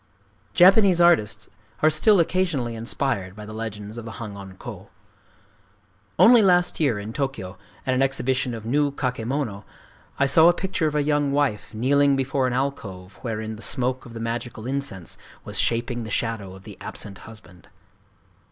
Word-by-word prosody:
Japanese 190 0 +6
artists 110 - +3 0.4
are 155 - +7
still 195 +6 +5
occasionally 165 -9 0
inspired 115 -4 -2
by 105 0 -9
the 105 - -9
legends 110 0 -6
of 115 - -9
the 110 - -7
Hangon 100 -4 -8
ho. 100 -6 -9 1.3
Only 240 0 +7
last 180 -3 +3
year, 140 -9 +2
in 105 +2 -6
Tōkyō, 135 -10 -3 0.3
at 130 - +1
an 130 - +1
exhibition 130 -2 0
of 110 -1 -8
new 145 +5 +2
kakemono, 125 -4 -3 0.5
I 140 - +3
saw 160 +4 +6
a 175 - +6
picture 185 -3 -1
of 150 - -2
a 150 - +2
young 145 -1 +1
wife 140 -7 -1
kneeling 140 +4 +3
before 135 0 0
an 125 - -2
alcove 105 -9 -4
wherein 110 -2 -4
the - - -11
smoke 130 +1 -1
of 115 - -12
the - - -5
magical 115 0 -4
incense 130 - -4 0.3
was - - -1
shaping 120 +1 0
the 110 - -7
shadow 105 -4 -3
of 95 - -14
the - - -12
absent 100 -1 -6
husband. 95 -5 -14
125 Hz, 165 wpm, -24 LUFS, 110-145 Hz, 1.3 s, are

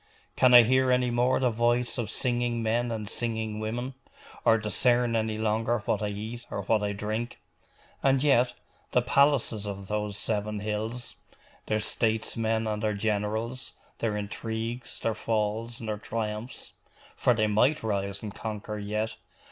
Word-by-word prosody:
Can 125 -1 +6
I 120 - +11
hear 130 +3 +3
any 125 -1 +2
more 125 +2 +2
the 125 -2 +2
voice 120 +2 +1
of 110 -4 -2
singing 120 -1 0
men 120 +2 +1
and 110 -2 -3
singing 110 -1 -2
women; 120 +4 -3 0.5
or 115 - +5
discern 120 +3 +2
any 110 -1 0
longer 110 +1 0
what - - 0
I 105 - 0
eat 110 +4 -5
or 100 - -3
what 110 +2 +2
I 105 0 0
drink? 110 +4 -3 0.6
And 135 0 +3
yet 130 -4 +4 0.4
the - - +4
palaces 135 -7 +3
of 100 -1 -6
those 105 -1 -2
seven 105 -1 -2
hills, 110 +3 -3 0.5
their 110 - +1
statesmen 110 0 0
and 105 -1 -2
their 105 -2 0
generals, 110 +4 -2 0.3
their 110 -2 0
intrigues, 110 +3 -4
their 115 - 0
falls, 110 +1 -2
and 115 - -7
their 105 -1 -2
triumphs 110 +2 -5 0.4
for 125 - +3
they 110 0 +2
might 120 +8 +2
rise 100 -2 -2
and 105 -2 -5
conquer 105 -1 -5
yet! 105 +2 -2
110 Hz, 155 wpm, -28 LUFS, 105-120 Hz, 0.6 s, I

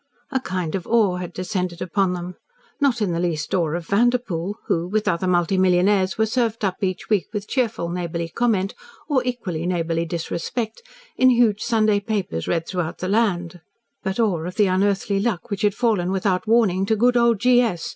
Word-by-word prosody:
A 265 - +1
kind 180 -9 -3
of 190 -3 -3
awe 215 -6 +3
had 180 -1 -5
descended 180 -1 -3
upon 185 +1 0
them 180 0 -5 0.5
not 255 -6 +2
in 190 - 0
the 170 - -1
least 165 -4 -2
awe 170 -4 +2
of 175 -1 -4
Vanderpoel, 205 -4 +1
who, 170 +1 0
with 210 +3 -1
other 170 +2 0
multi 180 +1 +2
millionaires, 185 +1 +3
were 220 - +3
served 225 -1 0
up 185 -2 -1
each 185 -2 -2
week 200 -8 +1
with 210 -1 -4
cheerful 230 -9 -1
neighbourly 170 -1 -3
comment 200 -2 0 0.3
or 285 -4 +2
equally 195 -10 -3
neighbourly 170 -2 -1
disrespect, 180 - -4 0.4
in 255 - +6
huge 230 -4 +3
Sunday 215 -3 +2
papers 200 - -3
read 165 -1 -1
throughout 175 -3 -3
the 185 - -4
land 180 -5 0 0.4
but 190 +3 -3
awe 195 -8 +1
of 180 +2 -6
the 210 - +4
unearthly 195 +1 +1
luck 210 -1 -2
which 200 - -2
had 205 -1 +2
fallen 210 -7 +1
without 190 +1 0
warning 215 -5 +3
to 220 - +2
good 245 +3 +3
old 235 -3 +3
G. 245 +2 +5
S. 195 -9 -2
195 Hz, 190 wpm, -22 LUFS, 175-220 Hz, 0.5 s, in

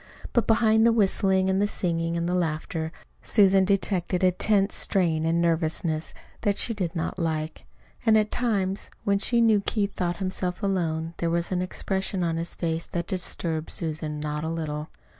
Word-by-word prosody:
But 235 - +2
behind 220 -1 +4
the 230 - +6
whistling 190 -3 +2
and 190 +1 +1
the 205 - +3
singing 170 -4 -1
and 170 0 -1
the 180 - 0
laughter 160 -1 -2 0.3
Susan 195 -2 +4
detected 185 -2 0
a 185 - +5
tense 195 +2 +2
strain 165 -5 +1
and 165 +1 +2
nervousness 165 -1 0 0.3
that 205 -2 +1
she 230 - +5
did 185 -5 -3
not 165 +3 -3
like. 160 -2 -3 0.4
And 220 -2 +5
at 215 0 +1
times, 200 -5 -1
when 200 0 +2
she 235 +3 +2
knew 220 -3 +4
Keith 205 0 -1
thought 175 -1 -2
himself 185 -1 -3
alone, 165 -4 -1
there 170 - -1
was 170 +1 -1
an 180 -1 0
expression 190 0 -2
on 165 -1 0
his 165 +1 -4
face 165 -1 -2
that 170 -1 -3
disturbed 165 -4 -2
Susan 155 -2 -3
not 150 0 -3
a 160 - -2
little. 155 -2 -4
180 Hz, 180 wpm, -26 LUFS, 165-200 Hz, 0.4 s, the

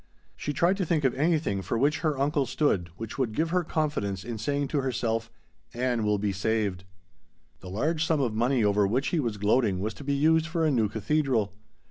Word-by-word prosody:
She 150 - -3
tried 175 +6 +2
to 195 - 0
think 160 -3 0
of 130 - +3
anything 150 - +1
for 115 - -2
which 145 +6 +2
her 155 -4 0
uncle 140 -1 +1
stood 125 - 0
which 115 +3 -7
would 115 -5 -1
give 165 +1 0
her 180 0 +2
confidence 145 - -2
in 115 -1 -5
saying 140 +5 -1
to 145 - 0
herself, 115 -3 -1 0.5
"Ann 120 -2 0
will 105 0 +2
be 100 0 -1
saved." 100 -1 -1 0.7
The 90 - -10
large 155 - 0
sum 160 -2 +1
of 125 -5 0
money 120 +2 +2
over 105 -1 +3
which 130 +7 0
he 170 - 0
was 115 -7 -2
gloating 105 -1 +2
was 105 +3 -2
to 145 - -11
be 140 0 0
used 160 +3 +3
for 165 -1 0
a 155 - +3
new 115 -6 +2
cathedral. 115 -2 0
130 Hz, 210 wpm, -27 LUFS, 105-150 Hz, 0.7 s, of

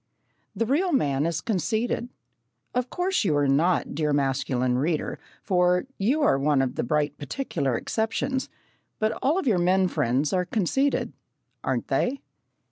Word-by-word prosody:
The 230 +3 0
real 325 +10 +1
man 145 - +1
is 165 -2 -2
conceited. 220 +6 -1 0.6
Of 250 0 -1
course 365 -2 0
you 155 -7 +2
are 145 -1 +2
not, 160 +7 +2
dear 150 0 0
masculine 130 -2 0
reader, 155 +2 -1 0.2
for 180 0 +2
you 265 +10 +2
are 135 - +3
one 140 -1 +2
of 125 - -2
the - - -2
bright 145 +2 0
particular 145 - -2
exceptions, 235 +4 -2 0.5
but 215 0 +1
all 295 +6 +2
of 380 - -1
your 210 -8 +3
men 185 +2 +3
friends 135 0 0
are 180 -1 +1
conceited 230 +9 0 0.5
aren't - - -2
they? 270 +3 0
180 Hz, 150 wpm, -25 LUFS, 145-240 Hz, 0.6 s, are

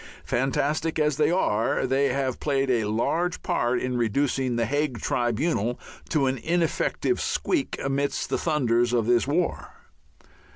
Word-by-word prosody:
Fantastic 145 +5 0
as 150 -2 +1
they 150 - +3
are, 115 - +1
they 135 +2 +2
have 130 -1 -1
played 135 -2 0
a 115 -3 +1
large 165 +12 -1
part 120 +1 0
in 125 -1 -2
reducing 130 +2 0
the 115 -1 +1
Hague 145 -1 -1
Tribunal 120 0 0 0.3
to 150 -4 +2
an 130 -1 0
ineffective 170 - 0
squeak 315 -7 -1
amidst 140 +1 -1
the - - +1
thunders 120 -7 +1
of 115 -3 +2
this 120 +2 +2
war. 170 +4 -1
135 Hz, 140 wpm, -25 LUFS, 120-150 Hz, 0.3 s, they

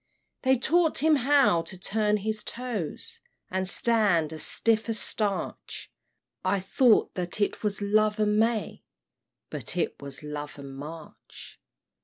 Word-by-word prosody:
"They 265 0 +3
taught 325 +6 +2
him 315 -1 +5
how 270 -9 +3
to 185 - -8
turn 210 +3 0
his 215 +1 -3
toes, 250 - -5 0.3
And 190 0 0
stand 200 -11 +2
as 155 - -4
stiff 225 0 +3
as 225 - 0
starch; 205 -4 -4 0.5
I 200 - +1
thought 220 +5 +3
that 180 +1 -5
it 205 - 0
was 205 -1 -2
love 215 +1 +2
and 210 0 +2
May, 225 -1 -1 0.7
But - - -4
it - - -2
was 140 +2 -5
love 150 0 -6
and 140 -1 -9
March! 155 +3 -11
210 Hz, 140 wpm, -27 LUFS, 175-230 Hz, 0.7 s, him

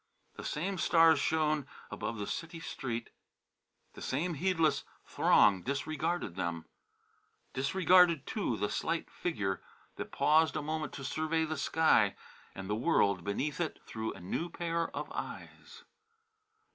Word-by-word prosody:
The - - -8
same 185 +5 -2
stars 165 -2 +5
shone 155 -3 +1 0.2
above 115 - -4
the 105 - -3
city 165 - -5
street; 120 -7 -5 0.8
the - - -11
same 165 +7 -1
heedless 165 0 +1 0.2
throng 95 -2 +4
disregarded 145 - -2
them; 85 -3 -3 0.9
disregarded, 170 +2 +4
too, 195 - -2
the 105 - -1
slight 165 0 -2
figure 105 - -2 0.4
that - - -6
paused 160 +1 +3
a 155 - -2
moment 155 0 -3
to 135 - -7
survey 160 +3 0
the 155 0 -3
sky 140 -8 +3 0.4
and 95 0 -6
the 105 - -1
world 100 - +2
beneath 145 - -2
it 160 - -2
through 110 0 -4
a - - -11
new 100 - -3
pair 170 -1 -1
of - - -3
eyes. - - -8
155 Hz, 135 wpm, -32 LUFS, 115-165 Hz, 0.9 s, stars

